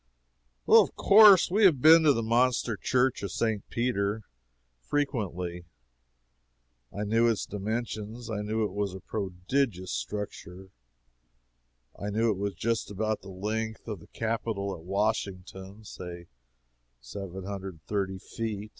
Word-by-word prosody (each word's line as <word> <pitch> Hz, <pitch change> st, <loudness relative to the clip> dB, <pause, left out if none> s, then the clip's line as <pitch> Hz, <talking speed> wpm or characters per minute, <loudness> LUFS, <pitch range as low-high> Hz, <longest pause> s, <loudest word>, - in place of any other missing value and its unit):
Of -, -, +6 dB
course 200 Hz, -4 st, +7 dB
we 210 Hz, +3 st, +3 dB
have 160 Hz, -8 st, +5 dB
been 160 Hz, +5 st, +8 dB
to 145 Hz, -, +6 dB
the 115 Hz, -, -1 dB
monster 120 Hz, 0 st, +2 dB
Church 125 Hz, +5 st, +1 dB
of 100 Hz, -2 st, -4 dB
St. 110 Hz, +3 st, -1 dB
Peter, 110 Hz, -3 st, -1 dB, 0.6 s
frequently. 90 Hz, -, -3 dB, 1.3 s
I 105 Hz, -, -4 dB
knew 115 Hz, +3 st, +2 dB
its 115 Hz, -, -1 dB
dimensions. 110 Hz, +2 st, -4 dB
I 110 Hz, -3 st, -3 dB
knew 110 Hz, +1 st, -1 dB
it 100 Hz, -, -4 dB
was 100 Hz, -2 st, -2 dB
a -, -, -7 dB
prodigious 95 Hz, +1 st, -2 dB
structure. 95 Hz, +6 st, -6 dB, 1.3 s
I 100 Hz, -, -3 dB
knew 110 Hz, +2 st, +1 dB
it 100 Hz, -, -3 dB
was 100 Hz, -1 st, -3 dB
just 115 Hz, +5 st, -1 dB
about 110 Hz, +1 st, -2 dB
the 100 Hz, -, -11 dB
length 110 Hz, +4 st, -4 dB
of 105 Hz, -5 st, -5 dB
the -, -, -16 dB
capitol 110 Hz, -3 st, -3 dB
at 85 Hz, -, -9 dB
Washington 95 Hz, +1 st, -3 dB
say 90 Hz, -4 st, -9 dB, 0.7 s
seven 95 Hz, +10 st, -8 dB
hundred 95 Hz, -1 st, -6 dB
and 80 Hz, -, -23 dB
thirty 95 Hz, -2 st, -2 dB
feet. 105 Hz, +1 st, -5 dB
105 Hz, 135 wpm, -28 LUFS, 95-115 Hz, 1.3 s, been